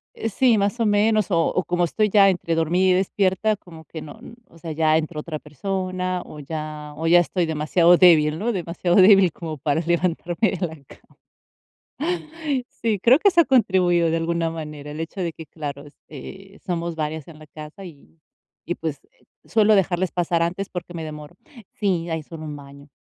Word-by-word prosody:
Eh, 225 - -3
sí, 235 +2 +3
más 205 +4 -1
o 230 - +2
menos, 210 0 +2
o 170 - +3
o 185 - 0
como 175 0 0
estoy 210 +5 0
ya 195 -1 +6
entre 170 -2 -1
dormida 175 +4 +2
y - - +5
despierta, 190 +2 +1
como 165 -5 -14
que 160 - -8
no 155 +8 -11 0.3
o 165 - -19
sea, 165 -1 -6
ya 155 0 +2
entró 155 0 -3
otra 155 -2 -6
persona 185 +3 -3
o 150 - -11
ya 150 0 -6
o 165 +2 -3
ya 175 +1 +7
estoy 175 0 0
demasiado 165 +3 +3
débil, 155 -4 +5
¿no?, 230 +6 -1
demasiado 175 -1 -1
débil 190 -2 +7
como 160 -2 -7
para 145 +4 0
levantarme 175 +3 0
de 180 -2 -2
la 160 - -10
cama. - - -20 1.5
Sí, 220 -3 -2
creo 250 +8 +6
que 400 - +4
eso 345 -3 +4
ha - - +5
contribuido 185 - +3
de 165 - +1
alguna 165 0 -1
manera, 150 -2 -7
el 150 - -7
hecho 165 +4 -6
de 170 -2 -2
que, 160 -1 -11
claro, 145 -1 -7
este, 190 +7 -12
somos 170 -1 -2
varias 155 -1 -4
en 160 -2 -12
la 155 - -14
casa 155 +6 -11
y 160 0 -16 0.5
y, 175 - -2
pues, 155 -4 -4
eh, - - -32 0.2
suelo 215 -1 +4
dejarles 185 -2 +1
pasar 175 -1 0
antes 180 +4 -2
porque 175 -1 -7
me 165 -1 -5
demoro. 150 +1 -9 0.4
Sí, 180 -5 -1
hay 160 -1 -3
solo 155 +1 -10
un 150 -1 -6
baño. 140 0 -14
170 Hz, 195 wpm, -22 LUFS, 155-190 Hz, 1.5 s, ya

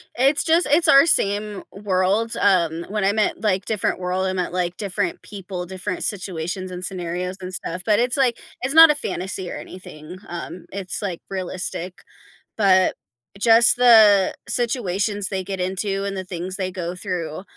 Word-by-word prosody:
It's 275 +6 +3
just 335 +1 +3
it's 320 +2 +3
our 275 +1 +8
same 205 - +1
world, 200 +3 0
um, 170 -4 +2
when 210 -2 -1
I 200 - +2
meant, 215 -3 0
like, 200 -3 0
different 215 -1 -1
world, 185 +1 -1
I 185 - -1
meant, 180 -2 -2
like, 180 -1 -2
different 200 -2 -3
people, 185 -3 -7
different 185 +1 -4
situations 185 -1 -2
and 180 0 -7
scenarios, 180 0 -4
and 185 0 -8
stuff, 180 +1 -5
but 210 -1 +3
it's, 245 +2 +1
like, 255 -4 +2 0.2
it's 265 +3 -1
not 325 -1 +9
a 300 - 0
fantasy 190 -7 -4
or - - -6
anything, 180 -1 -10
um, 175 +1 -7
it's, 195 0 -4
like, 185 -4 -4
realistic, 185 -1 -5 0.5
but 190 -3 +3 0.4
just 230 +2 +5
the 215 -6 +6
situations 205 -5 -1
they 190 -2 -3
get 190 -2 -4
into 195 +1 -2
and 200 -1 -4
the 185 - -5
things 185 +1 -5
they 185 -2 -3
go 180 -2 -5
through, 180 -3 -5
190 Hz, 170 wpm, -22 LUFS, 180-210 Hz, 0.5 s, not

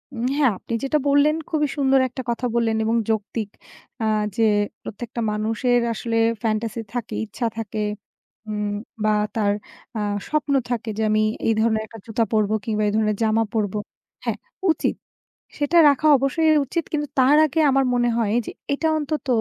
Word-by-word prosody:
উম 235 - -2
হ্যাঁ 275 -5 +4
আপনি 230 - -7
যেটা 275 +3 +2
বললেন, 285 +2 +4
খুবই 300 -2 +1
সুন্দর 270 -1 +4
একটা 260 +2 -6
কথা 235 +2 -1
বললেন 230 -1 +2
এবং 225 +1 +1
যৌক্তিক। 215 0 -2 0.5
আ - - +1 0.3
যে, 225 - +3 0.4
"প্রত্যেকটা 235 +3 -6
মানুষের 225 +4 +1
আসলে 230 0 -2 0.3
fantasy 225 +1 -1
থাকে, 245 -3 -4
ইচ্ছা 235 +3 -3
থাকে 215 -1 -3 0.7
উম 210 -1 -2 0.3
বা 215 - +3 0.2
তার 205 -2 +2 0.4
আ 215 - -1 0.3
স্বপ্ন 300 -2 0 0.2
থাকে 235 -1 -2
যে 220 - 0
আমি 215 0 +3 0.2
এই 225 - +4
ধরনের 220 -1 +2
একটা 225 +1 -12
জুতা 230 0 0
পরবো 215 -1 +2
কিংবা 215 -2 -1
এই - - +1
ধরনের 215 -2 +1
জামা 220 +1 +3
পরবো" 210 -2 -1 0.5
হ্যাঁ, - - -1 0.3
উচিত - - 0 0.7
সেটা 295 +4 +1
রাখা 285 +2 +2
অবশ্যই 295 +4 +2 0.2
উচিত। 335 +5 -2
কিন্তু 295 -1 -1
তার 265 +3 +6
আগে 310 +2 -1
আমার 270 0 +3
মনে 240 0 +2
হয় 220 -2 +1
যে - - -4 0.2
এটা 320 +3 0
অন্তত 300 0 -3
230 Hz, 165 wpm, -23 LUFS, 220-275 Hz, 0.7 s, তার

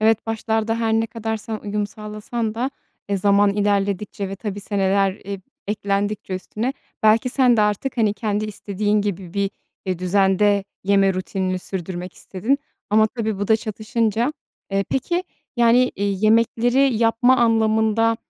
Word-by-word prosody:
Evet 220 0 +2
başlarda 225 0 -1
her 225 -1 +1
ne 225 0 +2
kadar 225 0 -3
sen 220 0 -5
uyum 210 0 -2
sağlasan 215 +2 -5
da, 250 +4 -1 0.4
e, 200 - +1
zaman 200 +1 +4
ilerledikçe 200 -1 0
ve 195 - -6
tabii, 205 -1 -5
seneler 195 -1 +1
eb 200 -1 -5 0.3
eklendikçe 205 -1 -1
üstüne 215 +7 -3 0.3
belki 220 +4 +4
sen 250 -2 +3
de - - +3
artık, 210 +6 0
hani, 215 -3 +2
kendi 210 +1 -1
istediğin 210 0 -1
gibi 190 -3 -4
bir, 200 -1 0 0.4
e, 185 -2 -1
düzende 195 +2 +3 0.2
yeme 195 -1 +3
rutinini 185 0 -2
sürdürmek 180 -1 -5
istedin. 220 +9 -1 0.3
Ama 215 +1 +5
tabii 220 -3 -3
bu 205 - -2
da 220 - +6
çatışınca. 225 +3 -1 0.4
Eee, 195 0 +1
peki 345 +7 0 0.3
yani, 240 +2 +4
iii, 200 0 -1
yemekleri 235 +4 +3
yapma 235 +3 +4
anlamında 225 -1 +3
210 Hz, 150 wpm, -22 LUFS, 200-225 Hz, 0.4 s, da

